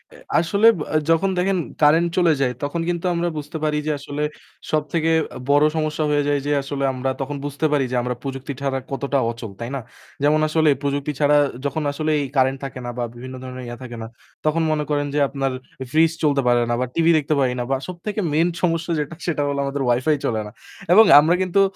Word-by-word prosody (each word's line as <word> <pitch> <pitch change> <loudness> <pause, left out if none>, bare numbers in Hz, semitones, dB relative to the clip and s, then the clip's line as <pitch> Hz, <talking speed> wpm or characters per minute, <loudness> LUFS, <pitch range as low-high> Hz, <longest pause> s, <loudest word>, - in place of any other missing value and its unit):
এ - - -14 0.2
আসলে 200 +6 +3 0.3
আ - - +4
যখন 165 +4 +3
দেখেন 190 +1 +1 0.2
কারেন্ট 165 +3 +5
চলে 170 -3 +4
যায় 125 -2 +1
তখন 165 +4 -2
কিন্তু 175 +1 -2
আমরা 170 +1 0
বুঝতে 150 +2 -5
পারি 150 -1 +1
যে - - +2
আসলে 145 +1 -4 0.5
সবথেকে 155 +2 0 0.2
আ - - -5
বড় 145 +1 +5
সমস্যা 155 0 -1
হয়ে 145 0 +2
যায় 145 0 +2
যে 145 - 0
আসলে 140 0 -4
আমরা 130 +1 -2
তখন 145 +2 -3
বুঝতে 145 +2 -2
পারি 140 -3 +2
যে 125 - -1
আমরা 125 0 -2
প্রযুক্তি 135 0 -5
ছাড়া 135 -1 -1
কতটা 140 +1 -1
অচল। 115 -3 -8
তাই 115 +1 -5
না? - - -2 0.4
যেমন 150 +1 +4
আসলে 155 0 +3
প্রযুক্তি 140 +1 -1
ছাড়া 145 0 +4 0.3
যখন 150 +2 -1
আসলে 155 +2 -1
এই 145 - -1
কারেন্ট 130 +1 +2
থাকে 135 - -7
না - - -3
বা 120 - -1
বিভিন্ন 130 +2 -8
ধরনের 130 0 -7
ইয়া 120 - -7
থাকে 120 -2 -8
না, - - -6 0.4
তখন 155 +2 +2
মনে 150 -1 0
করেন 145 -1 0
যে - - +2
আপনার 135 -1 -2 0.3
এ - - -8
ফ্রিজ 160 +1 +4
চলতে 140 -2 +3
পারে 120 0 +4
না - - +1
বা - - +1
টিভি 165 0 +4
দেখতে 155 0 0
পারি 130 -2 +2
না। - - 0
বা - - +3
সবথেকে 190 +4 -4
মেইন 165 +3 +3
সমস্যা 170 -1 0
যেটা 150 +3 -4
সেটা 160 -4 0
হলো 140 0 -1
আমাদের 140 0 -3
Wi-Fi 130 +6 +2
চলে 110 -2 0
না। - - -10 0.4
এবং 220 +4 +8
আমরা 160 +4 +3
কিন্তু 185 +1 +2
145 Hz, 220 wpm, -22 LUFS, 135-160 Hz, 0.5 s, এবং